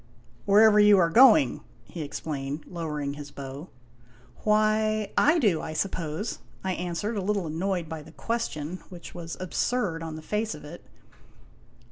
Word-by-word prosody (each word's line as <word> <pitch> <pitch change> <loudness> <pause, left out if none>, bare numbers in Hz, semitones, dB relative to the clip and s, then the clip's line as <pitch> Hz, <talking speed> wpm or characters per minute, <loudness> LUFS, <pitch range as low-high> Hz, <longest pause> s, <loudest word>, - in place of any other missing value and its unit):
" - - -30
Wherever 210 +1 +6
you 210 -1 +7
are 170 -3 +3
going," 265 - +6 0.2
he 170 - -7
explained, 145 0 -5
lowering 150 -5 -4
his 145 0 -8
bow. 140 +3 -8 0.3
" 120 +1 -27
Why, 215 0 +2
I 310 +4 +4
do, 205 - +2
I 160 - -5
suppose," 165 +3 -3 0.2
I 190 -1 -1
answered, 180 +5 -3
a - - -1
little 200 -1 -1
annoyed 170 +2 -2
by 160 0 -6
the 155 +2 -14
question, 165 -2 -3
which 175 -2 -10
was 165 -1 -7
absurd 185 -1 -1
on 160 -1 -5
the 155 - -9
face 210 0 -2
of 150 - -12
it. 165 +4 -10
175 Hz, 160 wpm, -27 LUFS, 155-210 Hz, 0.3 s, you